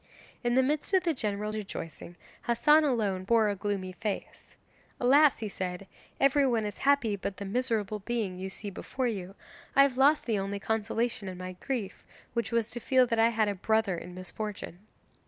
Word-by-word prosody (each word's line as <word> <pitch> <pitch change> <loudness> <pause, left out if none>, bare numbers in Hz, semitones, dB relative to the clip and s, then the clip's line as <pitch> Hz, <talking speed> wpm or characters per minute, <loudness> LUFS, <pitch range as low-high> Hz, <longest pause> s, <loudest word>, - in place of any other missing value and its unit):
In 240 0 +1
the 260 - +5
midst 300 +7 0
of 370 - +3
the 335 -2 +1
general 210 -4 -2
rejoicing 185 -5 -6 0.3
Hassan 295 +7 +5
alone 210 -9 0
bore 220 +1 +3
a 205 - -1
gloomy 195 -2 -3
face. 205 +2 -6 0.4
'Alas!' 280 +4 +5
he 220 - -4
said, 185 -1 -4 0.3
'everyone 270 -5 +3
is 205 -2 -5
happy 275 -7 +3
but 195 -1 -5
the 200 - -5
miserable 215 -1 -1
being 205 -4 -3
you 190 +1 -4
see 200 +2 -6
before 260 +7 -4
you. 195 -5 -3 0.4
I 275 - +8
have 270 -2 +1
lost 290 +3 +5
the 220 -4 0
only 200 +1 -3
consolation 225 0 -1
in 185 -1 -6
my 185 0 -6
grief, 210 +1 -4 0.3
which 235 -1 -1
was 230 -1 0
to 240 - -5
feel 255 +1 +4
that 230 -2 -1
I 225 +1 +6
had 220 -2 +1
a 205 - 0
brother 220 0 +1
in 175 +1 -8
misfortune! 185 0 -6
220 Hz, 185 wpm, -29 LUFS, 195-245 Hz, 0.4 s, I